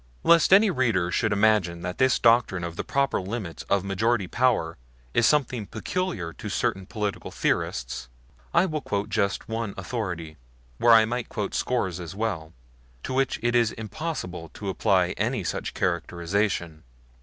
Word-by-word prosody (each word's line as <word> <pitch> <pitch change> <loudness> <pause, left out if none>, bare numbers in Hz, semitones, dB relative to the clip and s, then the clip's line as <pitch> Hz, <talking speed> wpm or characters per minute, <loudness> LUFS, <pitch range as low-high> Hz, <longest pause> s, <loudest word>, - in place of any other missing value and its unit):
Lest 170 0 +5
any 200 +1 +7
reader 115 - +1
should 110 +2 +1
imagine 100 -5 +2
that 90 0 -4
this 130 0 +4
doctrine 115 -6 +3
of 85 -1 -5
the - - -3
proper 140 -6 0
limits 95 -3 -5
of 100 -1 +2
majority 100 +2 +1
power 90 -7 +1 0.4
is 120 - +4
something 130 -7 +1
peculiar 110 - -3
to - - -7
certain 95 -1 -1
political 105 -2 -3
theorists, - - -2 0.4
I 185 - +4
will 155 -4 -2
quote 105 -3 -2
just 100 -1 0
one 115 -2 -3
authority 90 -7 -4 0.4
where 120 - +6
I 110 -1 +7
might 120 +1 -3
quote 105 -3 -3
scores 95 -9 -1
as 85 +1 -7
well 95 -7 -3 0.5
to - - -4
which 135 0 +1
it 120 0 +2
is 120 -2 +3
impossible 110 - -5
to 100 - -5
apply 95 - +2
any - - 0
such - - -3
characterization. 85 -2 -1
105 Hz, 155 wpm, -26 LUFS, 90-120 Hz, 0.5 s, any